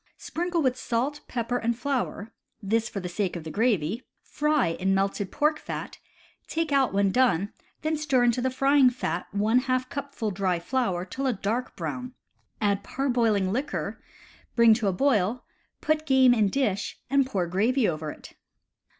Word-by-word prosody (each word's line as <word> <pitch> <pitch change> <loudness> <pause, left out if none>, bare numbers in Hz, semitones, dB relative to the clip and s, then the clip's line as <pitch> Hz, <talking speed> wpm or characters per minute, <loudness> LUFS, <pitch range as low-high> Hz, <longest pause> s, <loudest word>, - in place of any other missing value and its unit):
Sprinkle 345 -1 -2
with 255 -1 +1
salt, 255 +5 -1
pepper, 245 0 -2
and 230 0 -1
flour 245 -4 -2 0.3
(this 225 +2 0
for 200 - -4
the 180 - -5
sake 180 +1 -2
of 170 - -5
the 160 - -6
gravy), 210 -2 +1 0.2
fry 300 - +1
in 190 +1 +2
melted 195 0 -1
pork 305 +1 +1
fat, - - -6 0.5
take 325 -1 -2
out 275 -2 +3
when 200 0 +2
done, 200 -5 +2 0.3
then 310 +1 +1
stir 285 -5 +2
into 240 +1 +2
the 260 - +1
frying 270 0 +4
fat 180 -9 -3
one 215 +4 +3
half 255 0 -1
cupful 280 -6 -4
dry 185 -2 0
flour 185 -1 -1
till 270 +9 -3
a 255 - +2
dark 220 +5 -2
brown, 250 0 -5 0.4
add 200 -2 +1
parboiling 230 -8 +1
liquor, 260 +7 -3 0.5
bring 235 -2 +7
to 215 -2 0
a - - +3
boil, 225 0 +1 0.4
put 310 0 0
game 260 -2 +6
in 215 -4 +3
dish, 205 -6 -1
and 275 0 +2
pour 190 -8 -1
gravy 215 +8 +2
over 155 -2 -2
it. - - -11
235 Hz, 165 wpm, -26 LUFS, 200-265 Hz, 0.5 s, bring